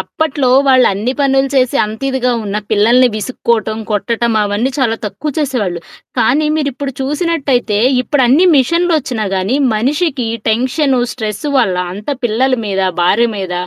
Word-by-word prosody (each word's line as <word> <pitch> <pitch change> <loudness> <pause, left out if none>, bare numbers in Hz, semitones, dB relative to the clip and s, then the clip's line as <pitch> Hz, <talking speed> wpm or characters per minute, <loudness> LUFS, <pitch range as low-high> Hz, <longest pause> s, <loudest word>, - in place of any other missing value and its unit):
అప్పట్లో 290 -4 -2 0.2
వాళ్ళన్ని 250 -2 +3
పనులు 270 -1 +2
చేసి 255 -2 +2
అంతిదిగా 250 +3 -2
ఉన్నా, 205 +1 -2
పిల్లలని 235 +4 +4
విసుక్కోటం, 220 0 -2
కొట్టటం 230 +2 -1
అవన్నీ 205 +5 -1
చాలా 230 -4 +1
తక్కువ 300 +8 -5
చేసేవాళ్ళు. 225 - -2 0.4
కానీ 290 +7 +2
మీరిప్పుడు 280 -2 -3
చూసినట్టయితే 275 - 0 0.2
ఇప్పుడన్ని 285 +5 +3
మిషన్లొచ్చినా 295 -5 +1
గానీ 195 +8 0 0.2
మనిషికి 265 +1 -1 0.2
టెన్షను, 255 +4 +1
స్ట్రెస్సు 220 +4 -4
వల్ల 190 -7 +1 0.2
అంతా 210 +9 -4
పిల్లల 250 +4 +1
మీద, 195 -1 -1 0.2
భార్య 205 +7 +3
మీద, 190 -2 -4
250 Hz, 125 wpm, -14 LUFS, 215-275 Hz, 0.4 s, పిల్లలని